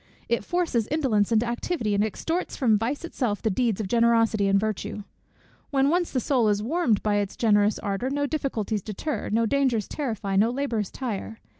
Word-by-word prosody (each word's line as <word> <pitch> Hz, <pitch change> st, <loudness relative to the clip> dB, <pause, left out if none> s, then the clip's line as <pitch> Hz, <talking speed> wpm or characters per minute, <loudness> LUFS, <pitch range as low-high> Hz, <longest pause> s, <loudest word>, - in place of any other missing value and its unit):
It 235 Hz, -, 0 dB
forces 335 Hz, -11 st, 0 dB
indolence 245 Hz, -9 st, +1 dB
into 225 Hz, +1 st, +3 dB
activity, 240 Hz, -1 st, -2 dB
and 200 Hz, +1 st, +2 dB
extorts 325 Hz, -, -2 dB
from 235 Hz, -6 st, +3 dB
vice 240 Hz, +10 st, -2 dB
itself 240 Hz, -10 st, -2 dB
the 220 Hz, -, +1 dB
deeds 225 Hz, 0 st, 0 dB
of 210 Hz, -, -2 dB
generosity 230 Hz, -2 st, +3 dB
and 195 Hz, 0 st, +4 dB
virtue. 210 Hz, 0 st, -3 dB, 0.7 s
When 275 Hz, 0 st, +2 dB
once 350 Hz, +2 st, +1 dB
the 260 Hz, -, -1 dB
soul 245 Hz, -3 st, +2 dB
is 205 Hz, 0 st, +1 dB
warmed 255 Hz, -, +1 dB
by 210 Hz, -1 st, +2 dB
its 205 Hz, -1 st, -2 dB
generous 210 Hz, -2 st, +3 dB
ardor, 205 Hz, +5 st, -2 dB
no 285 Hz, +1 st, 0 dB
difficulties 235 Hz, -8 st, -2 dB
deter, 220 Hz, -, -4 dB
no 230 Hz, +2 st, +2 dB
dangers 250 Hz, -4 st, +1 dB
terrify, 220 Hz, -9 st, -2 dB
no 215 Hz, +4 st, +4 dB
labours 240 Hz, -6 st, -2 dB
tire. 225 Hz, -3 st, -5 dB
230 Hz, 180 wpm, -25 LUFS, 210-275 Hz, 0.7 s, and